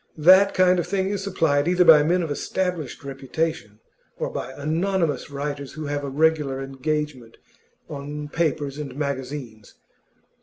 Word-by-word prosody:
That 185 +5 +6
kind 185 -1 +4
of 175 - -2
thing 190 0 0
is 200 -1 -3
supplied 160 -6 +1
either 180 0 +4
by 155 -3 +9
men 175 +4 +2
of 160 - -4
established 175 -1 -3
reputation, 135 -4 -4 0.4
or - - -3
by 130 - -5
anonymous 160 0 -1
writers 140 0 -5
who 155 0 -6
have 145 0 -3
a 140 - -3
regular 150 -2 +1
engagement 135 -2 -4 0.5
on 145 +1 -6
papers 145 -2 -1
and 140 -4 -6
magazines. 130 -6 -5
150 Hz, 145 wpm, -24 LUFS, 140-170 Hz, 0.5 s, by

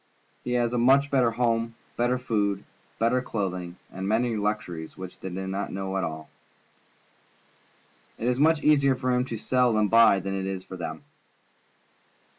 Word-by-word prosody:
He 125 - -2
has 120 -1 +1
a 120 - +1 0.3
better 130 -4 +4
home, 115 -1 0 0.2
better 120 +1 +1
food, 105 -5 -1 0.3
better 120 +3 +2
clothing, 90 -7 -4
and 95 +1 -5
many 115 +2 +1
luxuries 100 -6 -3
which 95 -1 -9
they 95 - -6
do 95 +1 -5
not 95 +1 -3
know 95 0 -4
at 95 - 0
all. 80 0 -5 1.9
It 115 - -3
is 125 +1 +1
much 155 +1 +3
easier 140 -3 +4
for 130 0 -1
him 125 0 +2
to 115 -3 -5
sell 125 0 +2
and 105 -2 +2
buy 115 -4 +6
than 95 +1 -4
it 95 0 -2
is 95 -1 -4
for 95 - -9
them. 80 -4 -6
110 Hz, 165 wpm, -26 LUFS, 95-125 Hz, 1.9 s, buy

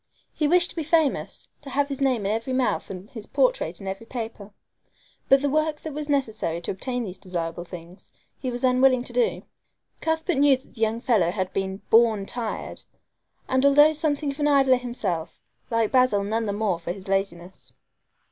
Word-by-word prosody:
He 300 - 0
wished 350 +2 +3
to - - -16
be 330 - -2
famous, 320 -2 0
to 285 - -10
have 280 +1 +1
his 275 -1 -5
name 255 -6 +1
in 200 - +1
every 230 +4 -2
mouth 250 -5 0
and 185 +1 -8
his 220 -4 -9
portrait - - +1
in 195 - -8
every 195 +4 -5
paper; 225 -4 -6 0.8
but 270 +1 +5
the - - +2
work 310 +1 0
that 315 - -6
was 300 +1 -5
necessary 220 - -1
to - - -3
obtain 245 +5 -3
these 185 -3 -7
desirable 175 -2 -4
things 175 +1 -12 0.3
he 260 - -3
was 245 0 -5
unwilling 255 0 +4
to - - -7
do. 480 -2 +1 0.6
Cuthbert 320 0 0
knew 280 -2 +5
that 260 - -20
the 225 - -10
young 225 +1 +1
fellow 215 -10 +2
had 185 0 -3
been 195 0 -3
"born 225 -3 +5
tired"! 230 0 -5 0.7
and 260 0 +1
although 290 +2 +6
something 295 -2 -1
of 275 - -11
an 295 - +2
idler 270 -3 +5
himself, 200 -10 -4 0.3
liked 230 -2 0
Basil 255 -6 +4
none 220 +2 -1
the 200 - -1
more 205 -4 0
for 170 - -4
his 190 +1 -8
laziness. 190 -2 -3
240 Hz, 195 wpm, -25 LUFS, 195-280 Hz, 0.8 s, although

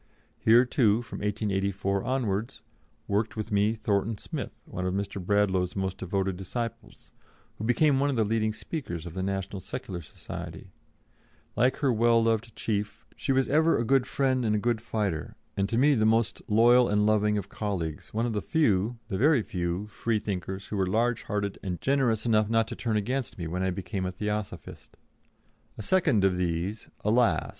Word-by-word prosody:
Here, 120 +3 +6
too, 120 -4 +2
from - - -8
1884 100 -2 -1
onwards, 120 -2 -2 0.4
worked 105 +2 0
with 110 0 -4
me 105 +2 +2
Thornton 105 0 0
Smith, - - -6
one 90 - -5
of 90 - -1
Mr. 100 -1 -3
Bradlaugh's 95 -2 +1
most 95 -1 -2
devoted 95 0 -1
disciples, 115 +4 -6 0.5
who 110 - -3
became 135 +4 +3
one 140 +1 +2
of 140 - 0
the 115 - +3
leading 110 0 +1
speakers 110 - -5
of 85 - -7
the 95 - -3
National 95 0 -3
Secular 90 0 -6
Society; 75 - -8 0.8
like 125 +2 +3
her 135 -4 +2
well 115 0 +4
loved 115 0 0
chief, 105 -2 -3
she - - -2
was 135 0 +2
ever 160 +3 +3
a 115 - 0
good 135 +1 +3
friend 130 -2 +1
and 105 -2 +2
a - - +2
good 115 +1 0
fighter, 105 -8 -2 0.2
and 100 0 0
to 115 - 0
me 145 +4 +5
the 110 -5 +2
most 110 +1 +2
loyal 120 +3 +5
and 105 0 +2
loving 105 0 +3
of 100 -2 -3
colleagues, 85 -8 -4
one 115 +2 0
of 120 - -1
the 105 - -1
few 115 - +1
the 95 -4 -3
very 140 -2 +4
few 90 +1 -2
Freethinkers 100 -4 -3
who 105 - -3
were 95 -1 +1
large 115 +4 +1
hearted 100 -1 -3
and 90 -3 -4
generous 125 -6 +1
enough 110 -2 +3
not 115 0 +2
to 120 - -5
turn 115 -3 -1
against 125 +5 -2
me 85 - -4
when 90 +3 -3
I 95 - +1
became 95 +1 -3
a - - -2
Theosophist. 105 +2 -5 0.8
A 110 - -6
second 140 - +3
of 95 -2 +3
these 90 +4 -2
alas! 115 +3 +2
105 Hz, 185 wpm, -28 LUFS, 95-115 Hz, 0.8 s, Here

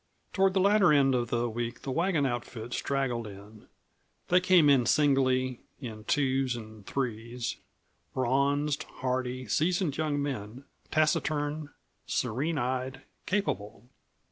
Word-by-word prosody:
Toward 190 0 +3
the - - +4
latter 200 -2 +5
end 140 -2 +4
of 120 -2 0
the 120 0 0
week 120 +1 -4
the 135 - -3
wagon 165 0 +1
outfit 120 -2 -4
straggled 125 -5 -1
in. 105 +2 -12 0.6
They 180 - +6
came 180 -4 +5
in 135 -4 +5
singly, 130 -3 +2 0.2
in 110 -5 -8
twos 135 -3 +1
and 110 -2 -10
threes, 120 -2 -3 0.6
bronzed, 140 +3 +1
hardy, 130 -1 -3
seasoned 165 - +1
young 155 -2 0
men, 130 -2 -4 0.2
taciturn, 155 -1 0 0.4
serene 145 +8 -1
eyed, 130 +1 -2 0.2
capable. 120 - -2
130 Hz, 120 wpm, -29 LUFS, 120-150 Hz, 0.6 s, They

